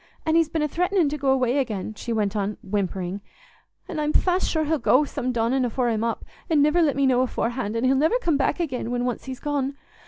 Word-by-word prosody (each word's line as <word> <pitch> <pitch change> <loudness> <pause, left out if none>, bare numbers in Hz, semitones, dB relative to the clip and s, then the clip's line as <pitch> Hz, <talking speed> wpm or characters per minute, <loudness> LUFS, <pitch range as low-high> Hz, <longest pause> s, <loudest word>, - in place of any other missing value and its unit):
An' 315 - +1
he's 330 -1 +3
been 320 -1 -1
a - - +1
threatenin' 360 +1 +1
to 300 - -3
go 270 -1 0
away 260 0 +2
again," 215 -5 -3
she 235 +3 -6
went 210 -2 0
on, 205 0 -2
whimpering, 195 -1 -2 0.7
"an' 315 - -4
I'm 300 0 0
fast 365 0 +2
sure 315 -1 0
he'll 310 0 0
go 270 +2 +4
some 260 -3 -3
dawnin' 245 +2 +1
afore 245 0 0
I'm 220 -1 0
up, 230 -1 -2 0.2
an' 300 -3 +4
niver 300 +4 +3
let 300 -4 +2
me 275 0 +2
know 255 -1 +3
aforehand, 240 -3 -2
an' 230 - -1
he'll 260 +1 +3
niver 315 - +3
come 335 -11 +1
back 280 +4 0
again 260 -8 -2
when 245 0 -1
once 245 - -3
he's 260 -1 -6
gone. 280 -1 -2
265 Hz, 240 wpm, -24 LUFS, 230-300 Hz, 0.7 s, go